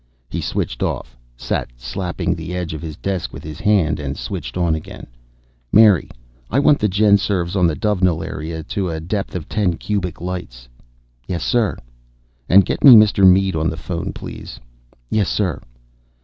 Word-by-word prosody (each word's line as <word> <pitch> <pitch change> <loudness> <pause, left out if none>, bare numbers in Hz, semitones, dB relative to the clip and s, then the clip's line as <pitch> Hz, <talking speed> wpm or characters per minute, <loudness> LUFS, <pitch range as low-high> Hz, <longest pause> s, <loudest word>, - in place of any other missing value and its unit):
He - - -3
switched - - -3
off, - - -3 0.2
sat - - -3
slapping 90 +7 -3
the 85 +1 -6
edge 90 -3 -3
of 80 - -6
his 80 -3 -7
desk 95 -3 -3
with - - -10
his 75 0 -8
hand, 80 -5 +2
and 70 -2 -4
switched 75 -11 -5
on 85 -3 +1
again. 80 - -6 0.7
"Mary, 105 -7 +5 0.4
I - - 0
want 145 +1 +4
the 105 - +1
GenSurvs 100 -3 +2
on 90 -3 +3
the 80 - 0
Dovenil 90 -5 +1
area 80 0 -5
to 95 +3 -3
a 80 -1 -3
depth 95 +5 -4
of 85 -4 -5
ten 95 -6 0
cubic 95 -5 -3
lights." 85 -9 -6 0.6
"Yes, 85 -2 -3
sir." 115 -5 +1 0.7
"And 95 +1 +7
get - - -3
me 135 -4 +11
Mr. 105 -3 +6
Mead 95 -1 +2
on 80 +1 0
the 80 - -5
phone, 85 +2 -4
please." - - -9 0.5
"Yes, 105 -3 +1
sir." 95 -6 -1
90 Hz, 170 wpm, -19 LUFS, 80-100 Hz, 0.7 s, me